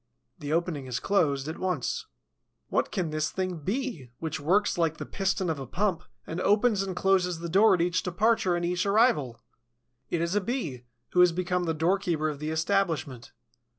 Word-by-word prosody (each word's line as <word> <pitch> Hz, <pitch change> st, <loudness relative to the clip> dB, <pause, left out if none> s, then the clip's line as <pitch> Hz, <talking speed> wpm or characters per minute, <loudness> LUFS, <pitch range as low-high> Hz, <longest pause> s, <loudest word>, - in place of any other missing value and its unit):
The 145 Hz, -2 st, -5 dB
opening 160 Hz, -4 st, -1 dB
is 125 Hz, -1 st, -2 dB
closed 145 Hz, -8 st, +1 dB
at 160 Hz, -, -5 dB
once. 185 Hz, -, -2 dB, 0.6 s
What -, -, 0 dB
can 180 Hz, -6 st, -2 dB
this 155 Hz, 0 st, -1 dB
thing 185 Hz, -2 st, -3 dB
be, 195 Hz, -, -3 dB
which 160 Hz, 0 st, -4 dB
works 190 Hz, +8 st, +2 dB
like 160 Hz, -2 st, +1 dB
the -, -, -5 dB
piston 195 Hz, -1 st, -1 dB
of 160 Hz, -3 st, -1 dB
a 135 Hz, -, -6 dB
pump, 190 Hz, -, 0 dB, 0.2 s
and 165 Hz, +3 st, -4 dB
opens 210 Hz, +1 st, +3 dB
and 190 Hz, -2 st, -3 dB
closes 180 Hz, -2 st, +2 dB
the 170 Hz, +1 st, -5 dB
door 195 Hz, +4 st, +5 dB
at 175 Hz, -, -1 dB
each 175 Hz, 0 st, +1 dB
departure 190 Hz, 0 st, +1 dB
and 175 Hz, 0 st, -1 dB
each 180 Hz, +1 st, 0 dB
arrival? 200 Hz, -, +2 dB, 0.7 s
It 170 Hz, -, 0 dB
is 170 Hz, +2 st, -1 dB
a 205 Hz, -, +2 dB
Bee, 175 Hz, -, -4 dB, 0.2 s
who 180 Hz, -, 0 dB
has 180 Hz, -1 st, +7 dB
become 180 Hz, +1 st, -1 dB
the 160 Hz, -1 st, -1 dB
doorkeeper 165 Hz, -1 st, +1 dB
of 145 Hz, -2 st, -6 dB
the 150 Hz, +1 st, -3 dB
establishment. 160 Hz, -, -1 dB
175 Hz, 185 wpm, -28 LUFS, 155-195 Hz, 0.7 s, has